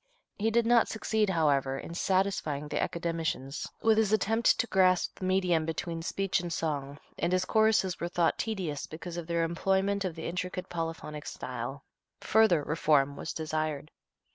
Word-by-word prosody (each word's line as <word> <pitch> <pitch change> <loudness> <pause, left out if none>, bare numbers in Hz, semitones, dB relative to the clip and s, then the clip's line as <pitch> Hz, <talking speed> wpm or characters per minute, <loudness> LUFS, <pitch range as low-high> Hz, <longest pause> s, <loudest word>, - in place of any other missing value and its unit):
He 220 +2 +2
did 230 +1 +2
not 235 0 +5
succeed, 220 -1 0
however, 140 -6 +2
in 170 - -7
satisfying 185 -6 0
the - - -1
Academicians 165 -5 -2 0.2
with 220 -1 +5
his 215 -2 +2
attempt 225 +2 +3
to - - +2
grasp 185 -4 +2
the 185 - -3
medium 185 -3 +2
between 165 +1 -3
speech 195 +3 0
and 175 -1 -5
song, 145 -3 -2 0.2
and 170 +2 0
his 185 0 +2
choruses 220 -5 +2
were 170 - -2
thought 175 -2 +1
tedious 185 -10 -3
because 165 +2 -7
of 170 -2 -5
their 170 -1 +1
employment 195 +4 +1
of 180 -4 -3
the 160 - -6
intricate 180 +1 -4
polyphonic 165 -3 -5
style. 125 +3 -5 0.4
Further 215 -8 +4
reform 145 -2 +2
was - - -5
desired. 155 -2 -3
170 Hz, 165 wpm, -29 LUFS, 155-195 Hz, 0.4 s, not